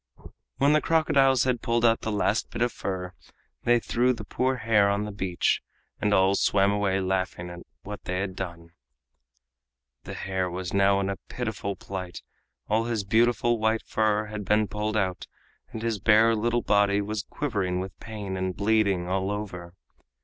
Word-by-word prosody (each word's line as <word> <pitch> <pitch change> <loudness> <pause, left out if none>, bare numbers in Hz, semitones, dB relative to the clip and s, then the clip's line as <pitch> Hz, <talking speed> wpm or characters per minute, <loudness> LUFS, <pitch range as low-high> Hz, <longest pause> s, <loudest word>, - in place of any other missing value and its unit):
When 140 +2 +4
the 155 - +4
crocodiles 135 -5 +3
had 125 -3 0
pulled 120 0 +1
out 115 -1 +3
the 110 - -3
last 105 +1 0
bit 115 - -1
of 120 - +1
fur, 90 -1 -4 0.5
they 120 0 +4
threw 125 +2 +1
the 115 - -7
poor 130 +4 0
hare 105 -4 +3
on 100 +1 0
the 105 - -5
beach, 95 -3 0 0.4
and 105 - +1
all 95 -1 +4
swam 100 0 +3
away 100 -1 +1
laughing 95 -2 -2
at 85 - -8 0.2
what 105 +1 -8
they 90 - -2
had 95 -1 -3
done. 85 -3 -7 1.3
The - - -6
hare 95 -1 -2
was 90 0 -5
now 100 0 +4
in 95 - -1
a 100 - -4
pitiful 110 -5 -3
plight, 90 -2 -7 0.4
all 110 +2 +1
his 115 -3 -1
beautiful 120 +3 +2
white 110 +1 +1
fur 110 -1 +1
had 105 0 -6
been 105 +2 +2
pulled 105 +1 -2
out, 95 -3 -1 0.4
and 110 - -6
his 115 -3 -1
bare 110 +2 +5
little 120 +2 0
body 100 -1 +3
was 105 +1 -2
quivering 100 -10 -2
with 95 0 -6
pain 105 -4 -6
and 95 -1 -2
bleeding 100 -4 +2
all 95 +1 -1
over. 90 -4 -5
105 Hz, 175 wpm, -26 LUFS, 95-115 Hz, 1.3 s, bare